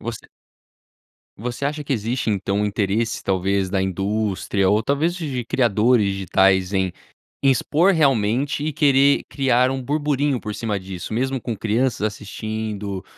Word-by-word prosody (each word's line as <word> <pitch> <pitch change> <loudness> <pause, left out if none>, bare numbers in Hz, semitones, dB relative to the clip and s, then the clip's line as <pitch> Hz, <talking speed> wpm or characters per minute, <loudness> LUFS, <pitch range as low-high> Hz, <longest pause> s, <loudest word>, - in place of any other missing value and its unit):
Você 115 -1 -6 1.1
Você 120 +5 -3
acha 150 +1 -4
que 140 - -2
existe, 115 0 -1
então, 100 0 -1
um - - +1
interesse, 105 +2 -1
talvez, 95 0 0
da 95 0 0
indústria 95 0 0
ou, 105 +2 +3
talvez, 145 +7 0
de 140 -9 -4
criadores 115 -1 +2
digitais 95 -1 +2
em 95 -1 +1 0.5
expor 145 - +3
realmente 135 - +1
e 155 - -1
querer 140 -1 +4
criar 130 -2 +2
um 135 0 -3
burburinho 145 -1 0
por 105 -1 -5
cima 105 -2 -2
disso? 95 +2 -7
Mesmo 130 +3 -1
com 120 -1 -4
crianças 115 +4 0
assistindo, 105 -2 -4
110 Hz, 140 wpm, -22 LUFS, 100-135 Hz, 1.1 s, querer